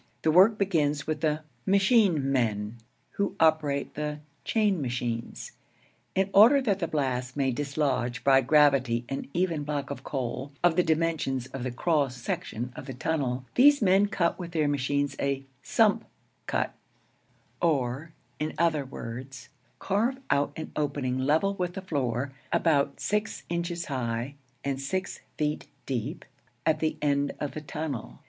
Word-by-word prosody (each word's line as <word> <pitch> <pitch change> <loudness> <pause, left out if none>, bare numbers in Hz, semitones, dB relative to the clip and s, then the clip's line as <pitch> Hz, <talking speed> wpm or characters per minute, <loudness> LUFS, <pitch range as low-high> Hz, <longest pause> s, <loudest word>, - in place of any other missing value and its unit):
The 160 - +4
work 195 +6 +6
begins 150 -7 +1
with 155 -1 -2
the 155 -1 +1 0.2
'machine 195 - +3
men,' 110 -4 0 0.3
who 200 -1 -2
operate 155 -3 +2
the 150 0 -3 0.3
'chain 210 -6 +1
machines.' 120 -2 -3 0.6
In 195 +1 +1
order 230 +8 +8
that 210 -8 0
the 170 - -1
blast 130 -3 -2
may 135 -2 +2
dislodge 135 -2 -1
by 135 -1 +6
gravity 135 -4 +3
an 135 - -4
even 170 -4 0
block 145 -1 -3
of 140 - -6
coal, 130 +1 -3
of 175 -2 +4
the 180 - +5
dimensions 160 -6 0
of 135 - -4
the 130 - -2
cross 140 0 +1
section 120 0 -4
of - - -8
the 135 - -6
tunnel, 130 -3 -1
these 285 +3 +6
men 195 -1 +4
cut 175 -4 0
with 175 -2 -6
their 155 -3 +2
machines 145 0 0
a 140 -1 -1 0.2
'sump 225 0 +3 0.4
cut,' - - -1 0.9
or, 145 -1 0 0.3
in 155 +1 -2
other 160 -3 +2
words, 130 0 -8 0.3
carve 225 +7 0
out 145 0 +2
an 160 - -6
opening 140 -4 -1
level 155 +9 +2
with 180 -2 -3
the 195 - -4
floor, 135 - -1 0.2
about 145 -4 +2
six 210 +1 -1
inches 170 0 -2
high 120 -1 -2 0.3
and 135 -1 -2
six 185 +7 -3 0.2
feet 150 0 -1 0.2
deep, 125 -5 -3 0.4
at 160 - +3
the 155 -1 -1
end 140 -1 +1
of 145 - -2
the 155 - -6
tunnel. 140 - -5
145 Hz, 150 wpm, -28 LUFS, 130-170 Hz, 0.9 s, order